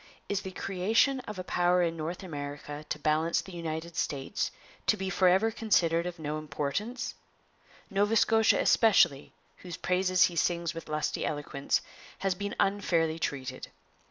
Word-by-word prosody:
Is 200 0 -1
the 190 - -6
creation 195 +9 +1
of 210 - -6
a 185 - -4
power 180 0 +2
in 165 -1 0
North 165 +4 -5
America 145 -2 -6
to - - -1
balance 155 +2 +1
the 190 - -7
United 165 -1 -5
States 140 -4 -2 0.4
to 215 - +4
be 190 -1 -3
forever 190 +4 +4
considered 175 -7 +2
of 180 0 -6
no 155 -1 -3
importance? 155 - -3 0.8
Nova 205 +3 +2
Scotia 225 0 +4
especially, 180 - +4 0.3
whose 180 -1 -8
praises 185 0 +2
he 175 - +2
sings 170 0 0
with 165 -1 -8
lusty 155 0 -1
eloquence, 145 -2 -1 0.4
has 195 -1 0
been 200 +3 -4
unfairly 170 -5 +1
treated. 130 -4 -4
175 Hz, 150 wpm, -29 LUFS, 155-195 Hz, 0.8 s, to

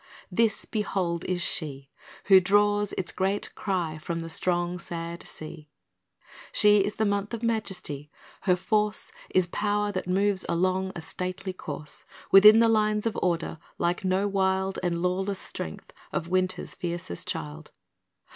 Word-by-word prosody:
This, 225 +4 +2
behold, 185 -5 -1
is 180 -1 -1
she 140 -4 -2 0.3
Who 190 -1 +8
draws 205 +2 +3
its 180 - -2
great 195 +2 -1
cry 175 -6 -2
from 165 +2 -4
the 165 0 -5
strong, 175 +1 0
sad 170 -1 -5
sea; 155 -1 -9 0.8
She 210 0 +5
is 205 +2 0
the 220 - +1
month 205 +2 -1
of 230 - -9
majesty. 195 -10 -2 0.3
Her 180 -2 +3
force 210 +3 0 0.2
Is 185 -1 +3
power 205 +3 0
that 185 -2 -4
moves 195 +1 +2
along 185 +2 +1
a 170 - -5
stately 185 +3 -5
course, 150 -4 -7 0.3
Within 210 +3 +9
the 230 - +6
lines 215 -1 +2
of 225 - 0
order, 170 -2 -1 0.2
like 175 +2 0
no 190 +2 +1
wild 190 -1 0
And 175 -1 -1
lawless 190 +2 0
strength 80 - -8 0.2
of 165 - -2
winter's 185 0 0
fiercest 175 +1 -4
child. 155 -3 -5
185 Hz, 145 wpm, -27 LUFS, 170-205 Hz, 0.8 s, Within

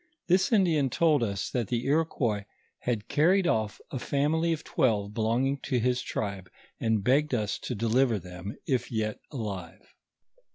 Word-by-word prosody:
This 185 +4 +3
Indian 165 - +3
told 155 +1 +3
us 100 -4 -2
that 120 -5 -1
the 120 +2 -1
Iroquois 135 -8 +1 0.3
had 115 -4 -2
carried 180 +6 +3
off 110 -8 0
a 130 - -3
family 155 +6 +1
of 160 -2 -2
twelve 105 -5 +1
belonging 120 +6 +1
to 130 - 0
his 125 +2 +1
tribe, 100 -3 -4 0.3
and 110 -3 +1
begged 140 +4 +3
us 105 -3 -1
to 125 - -4
deliver 115 +2 +2
thom, 90 +2 -7
if 125 -3 -1
yet 110 -2 -2
alive. 100 - -6
120 Hz, 155 wpm, -28 LUFS, 105-145 Hz, 0.3 s, This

